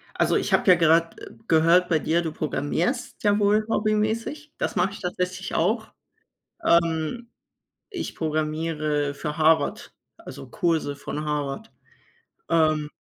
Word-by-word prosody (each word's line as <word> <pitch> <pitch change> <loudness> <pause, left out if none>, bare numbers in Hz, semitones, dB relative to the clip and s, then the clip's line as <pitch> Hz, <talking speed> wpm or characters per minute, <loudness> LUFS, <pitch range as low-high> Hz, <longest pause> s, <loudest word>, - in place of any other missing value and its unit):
Also - - +2
ich - - 0
habe - - +2
ja 180 - +9
gerade, 165 0 +2
äh, - - -12 0.2
gehört 165 +3 +4
bei 165 -3 +2
dir, 165 +3 +1
du 165 -2 -3
programmierst 160 - -2
ja 205 -1 +3
wohl 210 +1 +3
hobbymäßig. 220 +8 -1
Das - - -2
mache 195 - +1
ich 200 - -9
tatsächlich 180 +1 -3
auch. 220 +7 0 0.8
Ähm, 170 +7 +1 0.6
ich 375 -5 -5
programmiere 155 -2 -1
für 150 +1 -5
Harvard, 160 0 +2 0.2
also - - -10
Kurse 165 -6 -1
von 150 +2 -6
Harvard. 150 +8 -3 0.8
Ähm 155 -2 +2
165 Hz, 135 wpm, -24 LUFS, 155-205 Hz, 0.8 s, ja